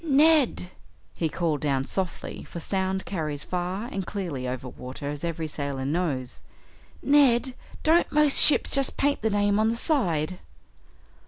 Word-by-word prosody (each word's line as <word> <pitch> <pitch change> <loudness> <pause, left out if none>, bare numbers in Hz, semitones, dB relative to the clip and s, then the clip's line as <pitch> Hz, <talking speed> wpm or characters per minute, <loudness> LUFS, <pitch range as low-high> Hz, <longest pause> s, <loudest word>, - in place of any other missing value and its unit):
"Ned!" 290 - +2 0.4
he 165 - -2
called 160 -3 -2
down 135 -2 -1
softly, 185 +2 -5
for 170 - -9
sound 190 +2 -2
carries 150 -6 -4
far 180 +4 -4
and 195 -5 -5
clearly 170 -10 -5
over 125 0 -5
water, 130 +3 -8
as 145 +1 -8
every 165 -1 -3
sailor 140 -3 -5
knows, 140 -5 -3 0.6
"Ned, 265 -3 +3 0.3
don't 325 +2 +2
most 300 -2 +7
ships 300 - +6
just 275 -1 +3
paint 285 0 0
the 220 - 0
name 205 0 +1
on 220 +1 +2
the 230 - -2
side?" 185 - -1
185 Hz, 150 wpm, -25 LUFS, 150-240 Hz, 0.6 s, most